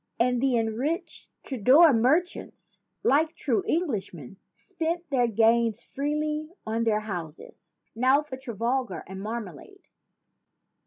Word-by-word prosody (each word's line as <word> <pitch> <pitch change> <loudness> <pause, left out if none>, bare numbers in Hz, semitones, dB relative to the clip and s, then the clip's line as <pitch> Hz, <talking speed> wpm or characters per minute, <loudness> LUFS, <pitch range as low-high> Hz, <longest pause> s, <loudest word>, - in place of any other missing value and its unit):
And 245 0 +2
the 265 -3 +2
enriched 235 - -3
Tudor 275 +6 +5
merchants, 285 +10 -1 0.2
like 310 +4 +2
true 245 -6 0
Englishmen, 195 - -3 0.2
spent 340 -2 -4
their 245 -3 +3
gains 230 0 +2
freely 300 +2 -3 0.2
on 225 +1 -1
their 215 -1 +1
houses. 175 -7 -8 0.2
Now 260 +5 +3
for 290 -3 -7
Trafalgar 240 - -3
and 190 +1 -8
marmalade." 210 -7 -7
245 Hz, 110 wpm, -26 LUFS, 220-295 Hz, 0.2 s, Tudor